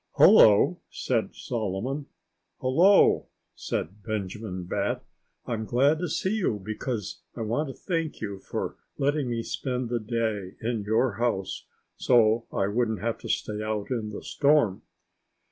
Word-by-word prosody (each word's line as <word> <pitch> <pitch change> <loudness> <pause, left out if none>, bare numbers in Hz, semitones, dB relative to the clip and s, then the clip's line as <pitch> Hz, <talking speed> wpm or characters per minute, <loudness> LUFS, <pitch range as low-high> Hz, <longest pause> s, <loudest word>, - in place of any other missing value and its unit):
"Hullo!" 110 - +7
said 115 -4 -1
Solomon. 120 +5 -3 0.5
"Hullo!" 175 +10 +5 0.3
said 100 +5 -4
Benjamin 100 -2 -4
Bat. 90 - -2 0.4
"I'm 115 -2 -2
glad 140 +7 +3
to 180 -1 -2
see 190 +6 0
you, 175 - 0
because 110 +1 -4
I 120 - -5
want 120 +7 -1
to 135 - -7
thank 165 -4 -3
you 100 -3 -5
for - - -4 0.2
letting 145 -1 +1
me 115 -1 -2
spend 125 -1 -3
the 120 -1 0
day 110 -4 -2
in 115 -4 -1
your 110 0 +2
house, 115 -6 -1 0.3
so 115 -2 +3
I 100 - 0
wouldn't 110 +1 0
have 115 +1 -2
to 115 - -8
stay 105 0 -1
out 110 +1 -3
in 115 -4 -2
the 105 - -7
storm." 140 -9 +2
115 Hz, 145 wpm, -27 LUFS, 105-130 Hz, 0.5 s, Hullo